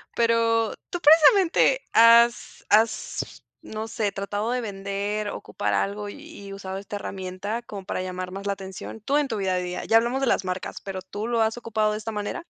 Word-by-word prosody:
Pero 230 Hz, -1 st, +2 dB, 0.2 s
tú, 350 Hz, -, -3 dB
precisamente, 330 Hz, +9 st, +5 dB
has 235 Hz, +1 st, +5 dB
has, 220 Hz, +1 st, +1 dB, 0.2 s
no 220 Hz, +1 st, -6 dB
sé, 215 Hz, -3 st, -1 dB
¿tratado 205 Hz, +3 st, -3 dB
de 250 Hz, -, 0 dB
vender, 205 Hz, 0 st, -3 dB
ocupar 205 Hz, -, -3 dB
algo 205 Hz, +1 st, -2 dB
y 290 Hz, -6 st, -11 dB
y 195 Hz, -, -8 dB
usado 190 Hz, -1 st, -6 dB
esta 200 Hz, +1 st, -7 dB
herramienta 195 Hz, +3 st, -4 dB
como 205 Hz, -5 st, -9 dB
para 185 Hz, -, -3 dB
llamar 185 Hz, 0 st, -5 dB
más 195 Hz, +1 st, -6 dB
la 200 Hz, -, +1 dB
atención? 190 Hz, +2 st, -8 dB
Tú 280 Hz, +6 st, +1 dB
en 295 Hz, -, +1 dB
tu 225 Hz, -5 st, -3 dB
vida 190 Hz, -2 st, 0 dB
diaria. 180 Hz, 0 st, -4 dB
Ya 225 Hz, -, +5 dB
hablamos 240 Hz, +4 st, +1 dB
de 270 Hz, -, +1 dB
las 195 Hz, -, +1 dB
marcas, 185 Hz, 0 st, -4 dB
pero 190 Hz, -1 st, -6 dB
¿tú 205 Hz, +4 st, -5 dB
lo 235 Hz, -1 st, +1 dB
has 220 Hz, +2 st, -1 dB
ocupado 220 Hz, -2 st, 0 dB
de 210 Hz, -, -2 dB
esta 225 Hz, +1 st, -5 dB
manera? 210 Hz, +11 st, -4 dB
210 Hz, 195 wpm, -25 LUFS, 195-230 Hz, 0.2 s, precisamente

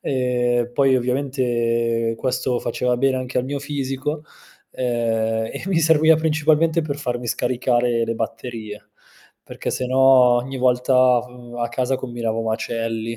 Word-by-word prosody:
e 125 Hz, -2 st, 0 dB
poi 135 Hz, -1 st, +3 dB
ovviamente 120 Hz, -3 st, 0 dB
questo 130 Hz, -1 st, -1 dB
faceva 125 Hz, -1 st, -1 dB
bene 130 Hz, 0 st, +1 dB
anche 130 Hz, 0 st, -3 dB
al 125 Hz, -, -1 dB
mio 140 Hz, +1 st, -4 dB
fisico, 145 Hz, +1 st, -4 dB, 0.5 s
ehm, 115 Hz, -2 st, -1 dB
e -, -, -7 dB
mi 185 Hz, -4 st, +1 dB
serviva 160 Hz, 0 st, +4 dB
principalmente 160 Hz, +1 st, +2 dB
per 145 Hz, -2 st, -4 dB
farmi 120 Hz, -3 st, -3 dB
scaricare 120 Hz, -1 st, 0 dB
le 115 Hz, -, -3 dB
batterie, 110 Hz, -2 st, -6 dB, 0.6 s
perché -, -, -5 dB
se 125 Hz, -, -2 dB
no 130 Hz, +1 st, -1 dB, 0.4 s
ogni 135 Hz, +2 st, -5 dB
volta 125 Hz, 0 st, +3 dB
v 125 Hz, -1 st, -13 dB
a 120 Hz, -, -1 dB
casa 130 Hz, +2 st, -1 dB
combinavo 120 Hz, -3 st, -3 dB
macelli. 115 Hz, 0 st, -3 dB
125 Hz, 135 wpm, -21 LUFS, 115-135 Hz, 0.6 s, serviva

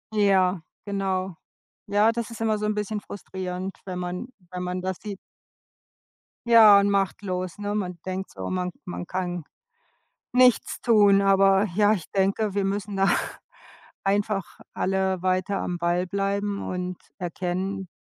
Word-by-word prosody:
Ja, 190 Hz, -3 st, +3 dB, 0.2 s
genau. 195 Hz, -2 st, -1 dB, 0.5 s
Ja, 205 Hz, +2 st, +4 dB
das 230 Hz, -1 st, -3 dB
ist 230 Hz, -, -9 dB
immer 220 Hz, -1 st, +1 dB
so 210 Hz, -, -4 dB
'n 210 Hz, -, +1 dB
bisschen 210 Hz, 0 st, -2 dB
frustrierend, 185 Hz, -1 st, -6 dB
wenn 185 Hz, -2 st, -5 dB
man 180 Hz, +6 st, -4 dB, 0.2 s
wenn 180 Hz, 0 st, -5 dB
man 180 Hz, 0 st, -3 dB
das 185 Hz, 0 st, -3 dB
sieht. 205 Hz, -2 st, -6 dB, 1.3 s
Ja, 220 Hz, -3 st, +9 dB
und 200 Hz, -, +2 dB
machtlos, 190 Hz, -2 st, -1 dB
ne? 205 Hz, 0 st, -3 dB
Man 180 Hz, -4 st, -3 dB
denkt 190 Hz, +1 st, -4 dB
so, 95 Hz, -1 st, -6 dB
man 180 Hz, -1 st, -2 dB
man 175 Hz, 0 st, -6 dB
kann 180 Hz, -3 st, -3 dB, 0.9 s
nichts 250 Hz, -1 st, +4 dB
tun, 205 Hz, -4 st, +5 dB
aber 195 Hz, 0 st, +4 dB
ja, 210 Hz, +1 st, +5 dB
ich 185 Hz, -7 st, -5 dB
denke, 195 Hz, +2 st, +1 dB
wir 200 Hz, -1 st, 0 dB
müssen 200 Hz, 0 st, -2 dB
da 195 Hz, 0 st, +3 dB, 1.0 s
einfach 200 Hz, 0 st, -1 dB
alle 190 Hz, -1 st, 0 dB
weiter 185 Hz, +1 st, 0 dB
am 175 Hz, -, -2 dB
Ball 175 Hz, +1 st, +1 dB
bleiben 200 Hz, +1 st, -1 dB
und 180 Hz, 0 st, -3 dB, 0.2 s
erkennen 185 Hz, +2 st, -3 dB
195 Hz, 145 wpm, -25 LUFS, 185-205 Hz, 1.3 s, Ja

